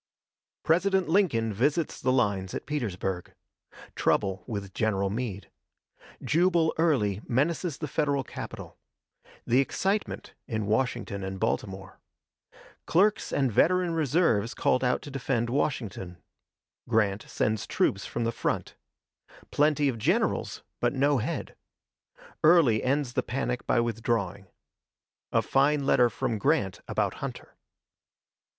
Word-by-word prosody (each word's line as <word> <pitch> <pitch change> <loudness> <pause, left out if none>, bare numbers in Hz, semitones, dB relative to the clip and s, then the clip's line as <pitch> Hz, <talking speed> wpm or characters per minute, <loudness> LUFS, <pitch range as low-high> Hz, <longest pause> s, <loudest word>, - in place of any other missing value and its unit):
President 185 +3 +2
Lincoln 135 - +2
visits 145 - 0
the 130 - +2
lines 100 -7 0
at - - -5
Petersburg 95 - -3 0.6
Trouble 95 -2 +1
with 100 -5 -5
General 100 -4 0
Meade 105 -3 -4 0.7
Jubal 170 0 +2
Early 110 - +2
menaces 150 +5 0
the 150 - -4
Federal 145 -2 0
capital - - -8 0.7
The 125 +3 +3
excitement 195 +9 -1
in 110 -4 -2
Washington 110 -2 -1
and 95 0 -5
Baltimore 95 -3 -3 0.9
Clerks 205 +5 +2
and 135 -3 +1
veteran 180 - +3
reserves 145 - +1
called 130 - +1
out 125 0 +1
to 145 - -8
defend 125 -3 -1
Washington 110 - -2 0.7
Grant 105 -3 +2
sends 110 -1 -1
troops - - +1
from 120 - -3
the 115 - 0
front - - -2 0.8
Plenty 150 0 +3
of 120 -4 -1
generals, 160 - 0 0.2
but 120 - +1
no 140 0 +2
head - - -4 0.9
Early 155 -9 +5
ends 135 -1 0
the - - +1
panic 125 -1 -3
by 125 - +3
withdrawing 115 -5 -1 0.8
A - - +2
fine 140 +1 +2
letter 125 -3 +4
from 115 -1 -2
Grant 135 -8 +1
about - - 0
Hunter. - - -7
125 Hz, 120 wpm, -28 LUFS, 105-150 Hz, 0.9 s, Early